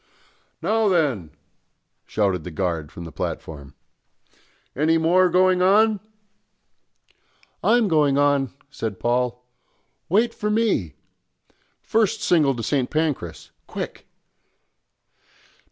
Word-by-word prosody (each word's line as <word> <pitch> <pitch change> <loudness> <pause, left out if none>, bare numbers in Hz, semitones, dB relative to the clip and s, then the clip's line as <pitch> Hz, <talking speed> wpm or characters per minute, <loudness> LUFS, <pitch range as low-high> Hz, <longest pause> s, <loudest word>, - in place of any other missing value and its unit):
"Now 220 +4 +2
then," 140 - +1 0.8
shouted 95 -6 0
the 90 - -6
guard 85 -3 -3
from 85 - -9
the 80 - -9
platform. 70 -1 -6 1.0
"Any 160 +4 +2
more 180 +3 +3
going 185 +1 +3
on?" 210 +3 +4 1.6
"I'm 235 -1 +4
going 150 -5 +3
on!" 145 -2 +2 0.2
said 110 -8 -5
Paul. 125 0 -1 0.6
"Wait 225 +6 +2
for 210 - -3
me. 210 - 0 0.9
First 220 -3 +1
single 150 -6 +3
to 115 - -5
St. 130 +1 0
Pancras, 145 - -3 0.2
quick!" - - -7
145 Hz, 100 wpm, -23 LUFS, -, 1.6 s, on